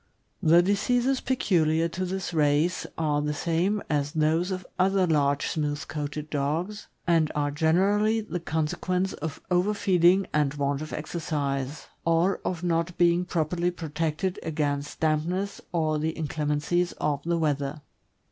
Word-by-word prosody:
.j 160 - +2
The 175 - +8
diseases 245 +7 +1
peculiar 165 -10 +2
to 185 +3 -3
this 185 0 -3
race 155 +3 +2
are 150 -2 +1
the 150 0 -1
same 175 +7 0
as 145 -1 -1
those 160 +3 +2
of 185 -1 -4
other 190 0 +3
large 145 -4 +2
smooth 150 -2 -2
coated 150 0 -5
dogs, 160 +9 -2 0.2
and 165 -3 +3
are 145 -1 0
generally 195 +8 +2
the 210 -5 -4
consequence 170 +4 -1
of 155 -1 -5
overfeeding 185 -1 +3
and 150 -1 +1
want 140 0 -1
of 155 - -6
exercise, 145 -3 -3 0.2
or 170 +3 +2
of 180 -1 -3
not 170 0 0
being 175 0 +3
properly 175 0 0
protected 165 +1 -2
against 145 -2 -2
dampness 165 +6 0
or 155 -3 +1
the 160 +1 -1
inclem 155 -1 -2
encies 175 +4 +1
of 145 -2 0
the 170 +3 0
weather. 145 -2 -1
165 Hz, 145 wpm, -27 LUFS, 150-180 Hz, 0.2 s, The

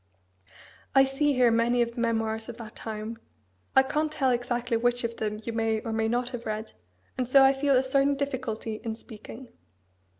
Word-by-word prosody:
I 270 - +8
see 275 +2 +1
here 250 -2 +4
many 235 +1 +3
of 235 0 -5
the 235 - -4
memoirs 225 -1 -1
of 235 - -7
that 225 -3 -10
time. 220 +1 -6 0.6
I 265 - +7
can't 300 +3 -1
tell 270 -4 +1
exactly 245 0 -1
which 245 +1 +1
of 230 0 -3
them 210 -1 -2
you 230 - -4
may 225 -1 +1
or 225 - -4
may 220 0 +1
not 240 +2 0
have 240 -2 -6
read, 215 0 -4 0.5
and 250 - 0
so 270 +2 +7
I 270 0 +6
feel 275 0 +2
a 255 - +4
certain 275 +2 +2
difficulty 255 -6 -3
in 225 -2 -3
speaking." 225 +2 -11
240 Hz, 195 wpm, -27 LUFS, 225-265 Hz, 0.6 s, I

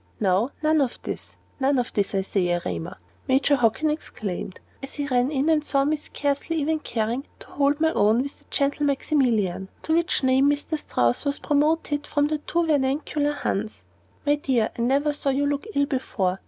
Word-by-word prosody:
"Now 200 +4 +2
none 310 0 +4
of 260 -3 -1
this! - - -6 0.2
none 270 +1 +2
of 245 - -1
this, 200 -1 0
I 195 - +1
say, 190 -2 0
Erema!" 90 - -3 0.3
Major 270 +2 +3
Hockin 245 +5 +2
exclaimed, 200 - -5 0.2
as 270 - -8
he 290 - -2
ran 250 -2 +2
in 285 0 0
and 315 -2 +3
saw 275 -2 +1
me 305 +2 +2
scarcely 290 +1 -2
even 315 0 0
caring 235 +1 -2
to - - -12
hold 285 +1 +1
my 320 0 +3
own 220 +4 +3
with 280 - -8
the - - -25
gentle 285 +1 0
Maximilian 235 - +1
to 315 - 0
which 335 -3 +1
name 265 +2 +4
Mr. 290 +2 -1
Strouss 120 - 0
was 285 0 -1
promoted 295 0 +1
from 290 -1 +1
the 305 0 -1
too 340 +3 0
vernacular 290 0 +1
"Hans." 215 - -3 0.4
"My 290 - +4
dear, 260 -6 +1
I - - -4
never 280 +5 +2
saw 285 -1 -2
you 275 +1 +1
look 285 +7 -1
ill 285 - +3
before. 195 -9 -1
280 Hz, 190 wpm, -24 LUFS, 235-295 Hz, 0.4 s, none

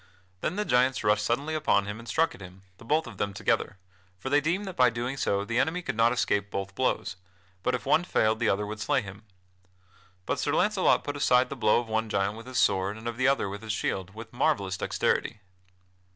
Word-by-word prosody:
Then 160 - -2
the 210 +1 -1
giants 125 - +2
rushed 105 0 +2
suddenly 140 +8 -1
upon 145 -10 +2
him 105 +2 -6
and 115 - -12
struck 165 +5 +1
at - - -14
him, 95 +1 -12 0.2
the - - -13
both 150 +7 +1
of 115 -6 -10
them 100 -1 -2
together; 95 - 0 0.4
for 130 +8 -6
they 145 +1 +4
deemed 175 +7 -1
that 190 -2 -6
by 125 -1 +5
so - - -8
doing 120 -4 -1
the 120 +1 0
enemy 175 +5 0
could - - -3
not 115 +1 +4
escape 100 -4 0
both 100 -1 -4
blows, 95 - -1 0.4
but 125 +6 0
if 125 - -6
one 165 - +3
failed 110 -10 +1
the 120 - +2
other 105 +1 0
would 105 +1 -6
slay 135 +3 +1
him. 100 +1 -10 1.0
But - - -1
Sir - - 0
Launcelot - - +3
put 145 0 -4
aside 125 -2 +3
the - - -3
blow 110 -4 +3
of 120 - -5
one 110 0 -1
giant 100 +1 0
with 115 +2 -11
his 130 -1 -5
sword 95 +1 +2
and 110 +1 -8
of 120 - -3
the 130 +1 +2
other 135 -6 +2
with 100 +1 -6
his 110 -1 -3
shield, 95 -2 -3
with 115 0 -10
marvellous 120 -8 +1
dexterity. 95 - -1
115 Hz, 230 wpm, -27 LUFS, 100-130 Hz, 1.0 s, by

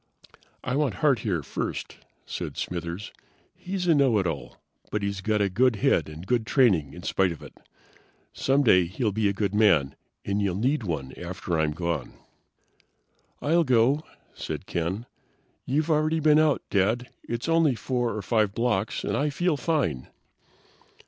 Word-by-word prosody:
"I 125 - -1
want 140 -8 +1
Hart 140 +1 +2
here 95 -8 -1
first," - - -4 0.3
said - - -5
Smithers. 85 +3 -4 0.4
"He's 185 0 -4
a 170 - +5
know 135 -6 +4
it 95 - +1
all, 80 -5 -4 0.3
but 105 -1 -2
he's 100 -1 -2
got 105 +1 +1
a - - +2
good 120 +5 +2
head 100 - +2
and 80 +3 -9
good 115 +1 0
training 95 - +3
in 90 - -10
spite 95 -2 +1
of 85 - -8
it. - - -11 0.8
Someday 130 -10 +3
he'll 105 +6 -1
be 105 0 +1
a - - -1
good 100 -1 -1
man, 90 -11 +3 0.3
and 100 +1 0
you'll 100 -3 0
need 130 +9 +1
one 75 -10 -4
after 90 -1 -3
I'm 75 -1 +1
gone." 85 +1 -3 1.3
"I'll 165 +3 +3
go," 130 +2 +3 0.3
said - - -6
Ken. 90 +7 -3 0.6
"You've 150 +5 +1
already 155 +1 +2
been 155 0 +5
out, 155 -2 +2
Dad. 110 +5 +1 0.2
It's 120 +3 -3
only 165 -5 +3
4 120 0 -1
or 105 - -4
5 105 -2 +1
blocks, 110 -3 0
and - - -1
I 150 +1 +1
feel 175 +3 0
fine." 135 - -1
110 Hz, 160 wpm, -26 LUFS, 90-140 Hz, 1.3 s, a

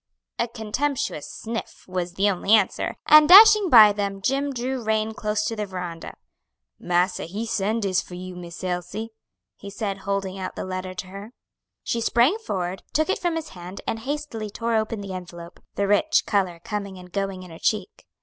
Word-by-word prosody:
A 235 - +1
contemptuous 230 - -3
sniff 230 0 -6
was 180 -1 -3
the 195 +1 +2
only 200 +1 +1
answer, 210 -3 0
and 305 0 +7
dashing 420 0 +9
by 215 -6 +9
them, 200 -1 -3
Jim 275 +7 0
drew 255 0 -3
rein 220 0 0
close 210 0 -1
to 225 - -2
the 210 -1 -3
veranda. 180 -3 -6 0.6
"Massa 180 +1 0
he 205 +7 -5
send 220 0 -1
dis 195 0 +1
for 180 - -11
you, 185 0 -8
Miss 175 0 -9
Elsie," 185 +5 -3 0.5
he 200 - -9
said, 200 -1 -4
holding 195 -1 -3
out 185 - -5
the - - -5
letter 185 0 -5
to 185 - -6
her. 200 +5 -10 0.5
She 235 - -2
sprang 245 - +3
forward, 185 - -4
took 315 +5 +2
it - - -1
from 345 -2 -1
his 320 -1 -4
hand 180 +2 -9
and 225 - -2
hastily 265 -4 -4
tore 230 +3 -3
open 220 -1 -1
the 195 -1 -6
envelope, 175 -1 -9 0.2
the 200 - 0
rich 205 +11 +3
color 185 -5 0
coming 200 -3 -5
and 180 0 -13
going 195 -1 -3
in 180 - -12
her 165 - -11
cheek. 220 - -2
205 Hz, 190 wpm, -24 LUFS, 185-230 Hz, 0.6 s, dashing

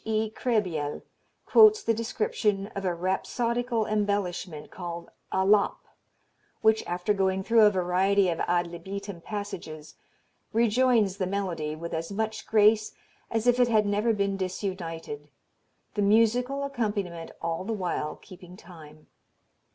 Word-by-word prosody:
E. 220 0 -1
Krehbiel 185 - -1 0.4
quotes 435 -1 +6
the 230 - +2
description 225 - -1
of 195 -1 -4
"a 180 -2 0
rhapsodical 230 +6 -1
embellishment, 200 -7 -2
called 170 -2 -7 0.2
'alap,' 200 +2 +2 0.8
which 220 0 +4
after 180 +4 0
going 190 -1 0
through 230 +2 +4
a 210 - +8
variety 190 +1 +2
of 170 -2 -1
ad 175 0 +2
libitum 190 +2 -7
passages, 190 -7 -6 0.6
rejoins 230 -3 +3
the 185 - -1
melody 180 -6 -2
with 170 +2 -7
as 165 +3 -3
much 220 +1 -3
grace 215 0 +3 0.3
as 225 0 -1
if 245 0 +4
it 245 - +5
had 215 -3 +3
never 205 +3 +1
been 200 -2 0
disunited, 170 -6 -5 0.6
the 205 - -1
musical 235 +6 +3
accompaniment 205 -11 -3
all 165 +1 -2
the 220 - -4
while 180 -7 -2
keeping 180 -1 -14
time. 155 -4 -14
200 Hz, 130 wpm, -27 LUFS, 175-220 Hz, 0.8 s, a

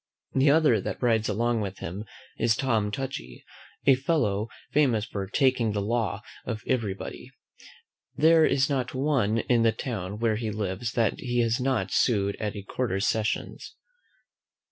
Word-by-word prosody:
The 135 +2 +4
other 145 -8 +4
that - - -4
rides 115 -3 +2
along 115 +2 0
with 100 -2 -4
him 95 +6 -6 0.3
is 115 -1 +3
Tom 110 -5 0
Touchy, 105 - -6 0.4
a 135 - +7
fellow 125 -7 0 0.2
famous 125 -8 +2
for 100 -2 -5
TAKING 125 -2 +2
THE 105 - -1
LAW 110 -1 -1 0.2
of 110 -3 -5
every 115 -7 0
body. - - -8 0.9
There 160 +1 +5
is 140 -3 +3
not 135 -3 -2
one 130 -6 +1
in 120 0 +2
the 115 0 +4
town 105 -6 -5
where 110 -1 +1
he 110 -1 -3
lives 105 +2 -3
that 115 -3 +1
he 120 -1 0
has 115 0 +1
not 125 -8 0
sued 100 -3 +2
at 105 -1 -3
a 100 - -6
quarter 110 -2 -2
sessions. 110 +2 -2
115 Hz, 160 wpm, -27 LUFS, 105-130 Hz, 0.9 s, a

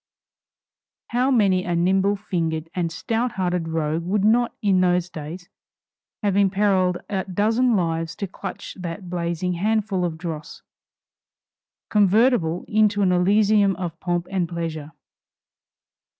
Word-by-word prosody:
How 250 +2 +1
many 200 -8 +3
a 175 -1 -1
nimble 190 +4 +2
fingered 165 -5 -3
and 170 -2 -1
stout 230 +7 -2
hearted 180 -3 -1
rogue 160 0 -1
would 195 +3 0
not, 235 +2 +3
in 195 -3 +2
those 180 -1 +1
days, 165 +4 -8 0.8
have 200 -2 +1
imperiled 195 -2 +2
a 190 -2 -2
dozen 220 +6 +2
lives 165 -2 -1
to 200 - -3
clutch 190 - -7
that 175 +1 -6
blazing 175 +1 -2
handful 205 0 0
of 165 -2 -2
dross, 160 -3 -7 1.3
convertible 205 -4 +3
into 210 -1 +2
an 185 - +3
Elysium 200 +2 +3
of 175 -2 -5
pomp 175 -1 -1
and 180 -3 -1
pleasure! 160 -3 -5
185 Hz, 125 wpm, -23 LUFS, 170-205 Hz, 1.3 s, many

